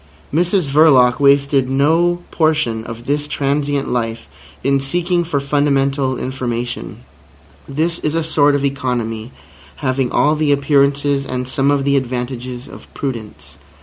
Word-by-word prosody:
Mrs 175 +1 +1
Verloc 135 -5 +5
wasted 140 -1 +3
no 165 +6 +2
portion 155 -9 +1
of 115 0 -8
this 145 +2 -1
transient 140 0 -1
life 115 -2 -3 0.4
in 140 +1 +2
seeking 175 +5 0
for 155 -4 -1
fundamental 140 -1 +1
information. 125 -2 -4 0.7
This 160 +5 -1
is 150 +1 -2
a 165 - 0
sort 145 -2 +3
of 140 0 0
economy 120 -4 -3 0.4
having 130 -3 -1
all 150 +1 +3
the 150 -1 +1
appearances 140 0 +2
and 125 -1 -4
some 135 +1 +1
of 140 -1 +2
the 140 0 +2
advantages 125 -1 -4
of - - -13
prudence. 105 - -6
140 Hz, 135 wpm, -18 LUFS, 125-145 Hz, 0.7 s, Verloc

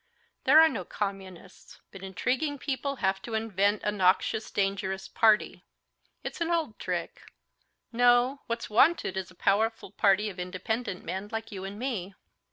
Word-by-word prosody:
There 290 +4 +8
are 320 - +8
no - - -3
communists. 195 -3 -7
But 195 - -11
intriguing 250 +10 -1
people 280 +1 -3
have 190 0 +1
to 225 +1 -5
invent 205 -2 +1
a 210 - +1
noxious, 200 +2 +1
dangerous 195 -1 -2
party. 215 -1 +2 0.6
It's - - -6
an 335 - 0
old 325 -10 -1
trick. - - -4 0.7
No, 245 +3 +3
what's 230 0 -3
wanted 245 - +3
is 190 -2 -4
a 185 - -17
powerful 220 +2 0
party 205 0 +3
of 195 -3 -7
independent 185 +3 -3
men 190 +2 -4
like 225 0 -5
you 190 -2 -6
and 195 +1 -7
me." 210 -7 -4
210 Hz, 155 wpm, -28 LUFS, 190-245 Hz, 0.7 s, There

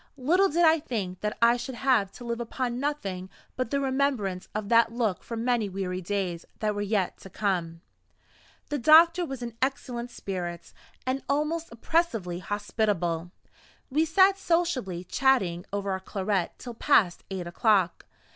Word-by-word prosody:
Little 350 +9 +3
did 340 +3 +3
I 320 0 +5
think 200 - -4
that 210 +2 -3
I 235 +1 +6
should 250 +1 -6
have 240 -7 +2
to - - -11
live 235 0 -3
upon 240 +1 -3
nothing 200 -11 -3 0.3
but 255 -2 -2
the 280 - 0
remembrance 260 -9 0
of 215 -1 -2
that 230 0 +5
look 230 -5 -1
for 230 - -6
many 235 -2 0
weary 185 -1 -3
days 180 -2 -2
that 215 -1 0
were 205 - -3
yet 205 -2 0
to 195 - -11
come. 175 -5 -2 0.9
The 290 - -1
doctor 335 +6 +6
was 270 -3 -6
in 235 -2 -6
excellent 255 -3 -2
spirits, 175 -6 -6 0.3
and 260 +1 -1
almost 305 +3 -1
oppressively 230 - 0
hospitable. 190 -4 -1 0.6
We 310 +4 +3
sat 380 +4 +4
sociably 310 - 0
chatting 190 -6 +1
over 200 -1 -2
our 190 - -1
claret 190 -1 -1
till 245 - -8
past 220 -7 +3
eight 190 -2 -4
o'clock. 190 0 +1
230 Hz, 155 wpm, -27 LUFS, 190-270 Hz, 0.9 s, I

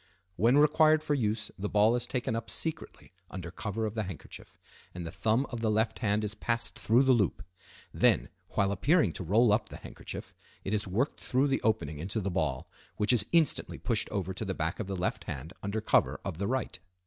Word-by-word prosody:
When 115 +9 +4
required 155 +1 +5
for 150 - 0
use 110 -5 -1
the 105 +1 -2
ball 105 +3 +4
is 120 0 -1
taken 125 -3 -2
up 115 0 -4
secretly 160 0 -5 0.2
under 85 -3 -7
cover 110 +4 -3
of 105 - -3
the 110 - -1
handkerchief, 95 -5 -9 0.4
and 90 -1 -5
the 80 - -5
thumb 115 +8 +1
of 120 -2 -4
the 110 - +1
left 110 +1 0
hand 105 -2 +1
is 105 0 -2
passed 115 +2 -2
through 120 +5 +4
the 135 - +4
loop. 110 -8 +1 0.5
Then, - - +3 0.3
while 100 0 +2
appearing 105 - +2
to - - -5
roll 105 +5 +4
up 110 - 0
the - - -8
handkerchief, - - -9 0.3
it 95 - -3
is 105 -1 0
worked 115 +10 -1
through 135 +3 +1
the 135 - 0
opening 85 -10 0
into 95 +7 -2
the 100 -1 -2
ball, 75 -8 -1 0.3
which 105 +3 +3
is 110 -3 +7
instantly 165 -4 +2
pushed 115 -4 0
over 95 -2 -3
to 95 - -5
the 95 -3 -3
back 80 +1 -2
of 110 - -3
the 100 - -3
left 90 0 -2
hand 75 +5 -6
under 100 +2 -2
cover - - +2
of 80 - -4
the 100 - -1
right. 130 +1 -2
110 Hz, 215 wpm, -30 LUFS, 95-120 Hz, 0.5 s, is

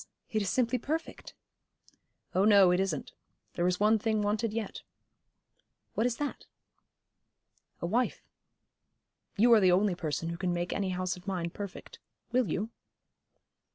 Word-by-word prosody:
it 215 - +1
is 195 - -1
simply 250 +2 +1
perfect.' 315 +7 -4 1.0
'Oh 190 - +3
no, 200 -3 +7
it 180 - +2
isn't. 185 -7 -2 0.4
There 175 - +1
is 180 0 0
one 215 +1 +4
thing 215 -1 0
wanted 210 +2 0
yet.' 220 -1 -4 1.1
'What 225 - +1
is 235 -2 -2
that?' 290 -1 -4 1.3
'A - - -1
wife. 240 +8 0 1.1
You 235 +3 +6
are 225 - +7
the 185 -3 +5
only 190 +2 +3
person 165 -1 -3
who 170 - -4
can 180 -1 -1
make 175 0 -2
any 195 -2 -1
house 185 0 -2
of 180 +2 -15
mine 175 -3 -2
perfect. 200 0 -8 0.3
Will 245 -6 +2
you?' 210 +8 -2
200 Hz, 150 wpm, -30 LUFS, 180-225 Hz, 1.3 s, no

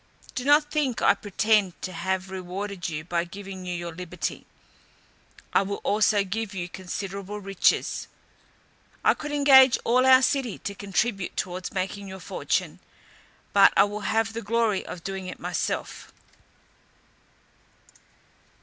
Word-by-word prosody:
Do 250 - -3
not 295 +1 +4
think 280 -6 0
I - - +6
pretend 205 -2 +1
to 185 - -4
have 190 +2 -2
rewarded 190 0 -5
you 155 -1 -4
by 170 0 -1
giving 190 +1 -9
you 180 - -2
your 170 -1 -5
liberty, 180 0 -5 1.1
I - - +5
will 200 +1 -3
also 210 -1 +3
give 205 +1 -4
you 175 -2 -3
considerable 195 +2 -6
riches. 195 -2 +1 1.0
I - - +5
could 295 -1 -7
engage 270 -3 +7
all 250 +2 +3
our 260 0 +7
city 260 -5 0
to 200 - -5
contribute 200 0 -2
towards 180 0 -3
making 195 +1 -3
your 190 0 -8
fortune, - - -2 0.7
but 200 -1 +7
I - - +8
will 205 +1 -3
have 225 0 +1
the 230 - -4
glory 225 -2 +1
of 170 - -8
doing 195 -1 -5
it - - -7
myself." - - -3
200 Hz, 140 wpm, -26 LUFS, 185-225 Hz, 1.1 s, I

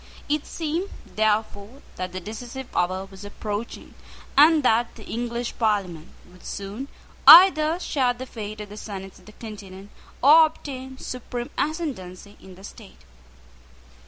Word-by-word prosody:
It 295 0 -1
seemed, 335 +4 -3 0.3
therefore, 215 +3 -1
that 185 0 -5
the 185 - -5
decisive 240 +6 -8
hour 185 +2 0
was 195 0 -13
approaching, 205 +2 -6 0.4
and 305 +1 +6
that 235 -1 +2
the 220 - -12
English 235 +1 -4
Parliament 195 -8 -1 0.2
would 180 - -18
soon 200 +7 -6 0.4
either 335 -2 +9
share 265 -8 +1
the 260 - -7
fate 215 -3 -7
of 210 - -9
the 210 - -10
senates 195 -3 -8
of 185 - -21
the - - -11
Continent, 200 -3 -10 0.3
or 315 +3 +8
obtain 265 -4 -9
supreme 245 -1 -6
ascendency 210 - -4
in 190 -1 -13
the 190 - -16
state. 210 0 -13
220 Hz, 140 wpm, -24 LUFS, 200-265 Hz, 0.4 s, either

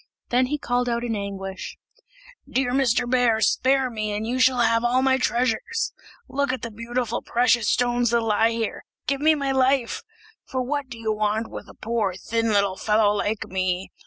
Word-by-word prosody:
Then 250 +1 +3
he 295 +3 -1
called 245 -2 -1
out 235 0 -1
in 230 -2 -1
anguish, 195 -2 -6 0.7
"Dear 260 -1 0
Mr. 250 -2 +2
Bear, 245 -3 +3
spare 265 +4 +2
me, 215 -2 -3
and 210 +1 -2
you 250 +3 -2
shall 255 -1 +4
have 230 0 +3
all 250 +2 +2
my 265 0 +3
treasures; 255 - 0 0.3
look 280 -1 0
at 255 0 -4
the 230 - -4
beautiful 235 +1 -3
precious 240 -2 +2
stones 245 -1 +2
that 235 0 +2
lie 225 +1 +2
there. 225 -1 -3 0.2
Give 275 0 -1
me 310 +1 +5
my 275 -2 -1
life! 265 -2 +1 0.4
for 260 -1 -3
what 280 +1 -3
do 240 - -8
you 220 -1 -1
want 215 +1 -1
with - - -8
a - - -14
poor 215 -5 -1
thin 230 +4 -1
little 200 -2 +2
fellow 210 -1 +3
like 210 +1 -1
me? 185 0 -2
235 Hz, 190 wpm, -24 LUFS, 215-255 Hz, 0.7 s, me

